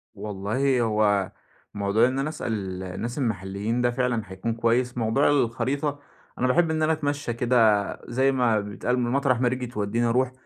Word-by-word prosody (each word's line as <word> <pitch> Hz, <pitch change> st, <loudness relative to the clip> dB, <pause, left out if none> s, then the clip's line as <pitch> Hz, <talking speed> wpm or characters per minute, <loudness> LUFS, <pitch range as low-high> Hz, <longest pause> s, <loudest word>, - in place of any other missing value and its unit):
والله 110 Hz, +6 st, -1 dB
هو 105 Hz, -3 st, +1 dB, 0.4 s
موضوع 105 Hz, +3 st, +2 dB
إن 130 Hz, +1 st, -2 dB
أنا 140 Hz, +3 st, -1 dB
أسأل 100 Hz, -10 st, -4 dB
الناس 110 Hz, +7 st, -5 dB
المحليين 110 Hz, -1 st, -2 dB
ده 120 Hz, 0 st, +2 dB
فعلًا 125 Hz, -2 st, 0 dB
هيكون 95 Hz, +4 st, -4 dB
كويس، 120 Hz, +2 st, 0 dB
موضوع 115 Hz, +4 st, +2 dB
الخريطة 140 Hz, +2 st, 0 dB, 0.4 s
أنا 130 Hz, -, +2 dB
باحب 165 Hz, +5 st, +3 dB
إن 155 Hz, 0 st, 0 dB
أنا 160 Hz, +1 st, +3 dB
أتمشّى 145 Hz, -4 st, -2 dB
كده 115 Hz, -4 st, +3 dB, 0.2 s
زي 130 Hz, +3 st, +2 dB
ما 120 Hz, -5 st, +2 dB
بيتقال، 105 Hz, +5 st, -2 dB
م 120 Hz, 0 st, -1 dB
مطرح 135 Hz, -3 st, +2 dB
ما 125 Hz, -, +3 dB
رجلي 125 Hz, 0 st, -2 dB
تودّيني 115 Hz, 0 st, -1 dB
أروح، 125 Hz, +2 st, +1 dB
120 Hz, 165 wpm, -25 LUFS, 105-130 Hz, 0.4 s, باحب